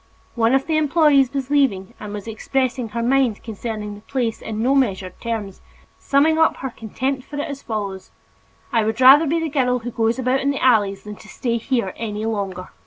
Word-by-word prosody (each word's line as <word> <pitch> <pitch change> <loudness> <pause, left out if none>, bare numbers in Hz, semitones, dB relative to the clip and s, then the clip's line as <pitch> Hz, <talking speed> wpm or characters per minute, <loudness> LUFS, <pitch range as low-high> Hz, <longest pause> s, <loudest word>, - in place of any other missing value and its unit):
One 235 +2 +2
of 270 - +1
the 315 -1 0
employees 295 -3 +4
was 275 -1 -4
leaving 235 -10 +1
and 210 - -7
was 210 0 -7
expressing 250 +2 -2
her 230 +2 -3
mind 255 -3 +1
concerning 215 -1 -5
the 205 - -11
place 235 -1 -2
in 220 -1 -5
no 260 +3 +3
measured 195 -9 0
terms, 220 -5 -4 0.4
summing 310 +3 +2
up 320 - +3
her 265 - -5
contempt 255 +5 -3
for 295 - -10
it 290 - -2
as 280 -1 -6
follows: 200 -4 -5 0.6
"I 230 -2 +3
would 220 +2 -2
rather 275 +5 +8
be 330 +4 +1
the 325 - -1
girl 255 -4 +1
who 245 0 -6
goes 225 +1 0
about 260 +1 +1
in 275 - 0
the 280 - -1
alleys 205 -6 +2
than 210 -1 -8
to - - -15
stay 235 +1 -2
here 230 -5 -1
any 215 -1 -4
longer!" 195 -4 -3
235 Hz, 205 wpm, -21 LUFS, 215-270 Hz, 0.6 s, rather